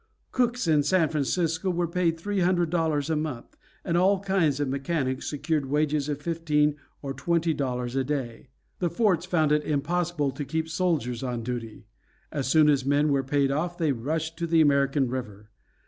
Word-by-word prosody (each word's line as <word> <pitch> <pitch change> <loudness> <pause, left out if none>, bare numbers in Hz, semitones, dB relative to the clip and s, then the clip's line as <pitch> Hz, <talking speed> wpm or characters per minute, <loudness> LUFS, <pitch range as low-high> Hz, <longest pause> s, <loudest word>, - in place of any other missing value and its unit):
Cooks 245 -4 0
in 155 -2 +4
San 160 +1 +2
Francisco 160 +4 0
were 175 -1 0
paid 170 -1 0
three 205 +4 -2
hundred 175 -2 +2
dollars 160 -4 0
a - - +2
month, 150 -6 -4 0.3
and 170 - 0
all 190 +3 +3
kinds 185 -8 +1
of 145 - 0
mechanics 135 -1 -2
secured 150 -1 -1
wages 150 0 0
of 145 -1 -2
fifteen 150 -3 +1 0.3
or 135 -1 -3
twenty 165 +4 0
dollars 125 -3 -3
a 135 - +1
day. 130 -3 -4 0.3
The 175 - 0
forts 180 -2 +1
found 160 -5 +2
it 150 0 +3
impossible 155 0 -1
to 135 +3 -5
keep 160 +3 -2
soldiers 160 -9 -1
on 125 -3 -3
duty. 115 -3 -5 0.5
As 140 -4 -2
soon 155 +2 +5
as 140 -3 +3
men 145 +2 +2
were 140 -1 +2
paid 135 +1 +1
off 170 +5 -2
they 160 -4 +1
rushed 160 +6 -3
to 170 -1 -2
the 165 0 +3
American 140 -2 +3
River. 110 -5 -6
150 Hz, 180 wpm, -26 LUFS, 135-170 Hz, 0.5 s, soon